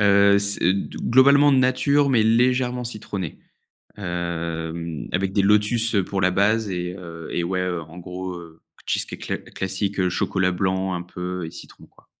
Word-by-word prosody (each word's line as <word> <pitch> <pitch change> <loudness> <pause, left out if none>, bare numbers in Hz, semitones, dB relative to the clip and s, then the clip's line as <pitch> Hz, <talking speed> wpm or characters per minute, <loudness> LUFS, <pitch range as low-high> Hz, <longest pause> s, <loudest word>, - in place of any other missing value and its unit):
Heu, 100 0 +5
c'est 100 -3 +2
d 100 - -4
globalement 140 +3 +6
nature, 135 +2 +3
mais 120 -4 +4
légèrement 125 +2 +2
citronné. 100 -7 -5 0.6
Hem, 85 -3 -4
avec 95 +1 0
des 100 - +3
lotus, 105 +3 +2
heu, 100 - +3
pour 95 -1 -2
la 95 -1 +3
base 105 +3 +2
et 90 0 -3
heu 85 -3 -9
et 85 - -1
ouais 90 +1 -1
en 85 -2 -5
gros, 90 +1 -6
heu, 80 -1 -14 0.3
cheesecake - - -2
cla - - -3
classique, 95 +1 -3
heu, 90 -1 +2
chocolat 90 +1 0
blanc 95 +1 -1
un 90 0 -3
peu 90 0 -5
et 80 - -8
citron - - -12
quoi. - - -25
95 Hz, 165 wpm, -23 LUFS, 90-110 Hz, 0.6 s, globalement